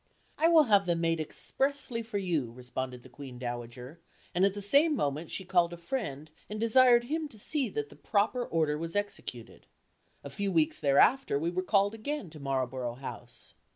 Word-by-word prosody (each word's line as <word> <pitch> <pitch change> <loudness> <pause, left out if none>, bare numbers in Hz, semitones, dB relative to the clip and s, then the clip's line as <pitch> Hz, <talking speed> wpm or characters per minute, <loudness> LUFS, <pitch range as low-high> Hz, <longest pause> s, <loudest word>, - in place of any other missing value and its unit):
"I 320 - +5
will 330 -2 +7
have 205 -7 +3
them 170 -1 +1
made 165 -1 +1
expressly 265 - -1
for 220 -2 -4
you," 165 - -1
responded 125 0 -6
the - - -13
Queen 125 0 -10
Dowager; 120 +4 -7 0.3
and 180 - +2
at 195 0 +3
the - - -4
same 290 +9 +4
moment 155 - -2
she 190 - -5
called 175 -2 +2
a - - -7
friend 170 - -4 0.2
and 210 +1 -5
desired 240 +1 +5
him 310 +5 -2
to 235 - -16
see 270 +3 -1
that 145 -6 -4
the - - -14
proper 210 - 0
order 155 -6 0
was 165 +2 -4
executed. 200 - -5 0.6
A 140 - -7
few 200 +7 -2
weeks 160 -3 +2
thereafter 145 - +4
we 165 +4 -1
were 185 +1 -1
called 200 +2 +2
again 225 - -5
to 155 - -10
Marlborough 130 -3 -2
House. 135 +2 -6
175 Hz, 190 wpm, -30 LUFS, 140-225 Hz, 0.6 s, will